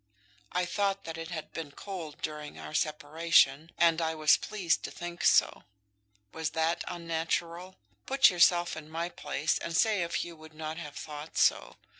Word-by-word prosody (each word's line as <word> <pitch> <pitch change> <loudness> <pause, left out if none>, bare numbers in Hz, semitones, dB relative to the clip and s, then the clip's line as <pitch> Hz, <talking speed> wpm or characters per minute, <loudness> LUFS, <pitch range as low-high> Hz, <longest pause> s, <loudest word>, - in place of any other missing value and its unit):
I 180 0 0
thought 195 +1 -1
that 165 - -6
it 165 0 -6
had 160 -3 -6
been 160 -2 -5
cold 170 -6 -8
during 150 -1 -5
our - - -8
separation, 155 0 +2
and 170 -1 +4
I 160 0 -1
was 155 -1 +5
pleased 185 -5 -1
to - - -4
think 175 -2 -7
so. - - +4 0.7
Was 160 -1 -2
that 160 +1 +1
unnatural? 170 +2 -3 0.3
Put 270 -4 +6
yourself 175 0 +4
in 155 -1 -9
my 165 +2 -3
place, 150 -2 -1
and 170 - -2
say 215 -2 +3
if 170 0 -1
you 170 -1 -9
would 155 0 -15
not 155 0 -5
have 150 -3 -8
thought 150 0 -8
so. - - +2
165 Hz, 170 wpm, -30 LUFS, 155-175 Hz, 0.7 s, Put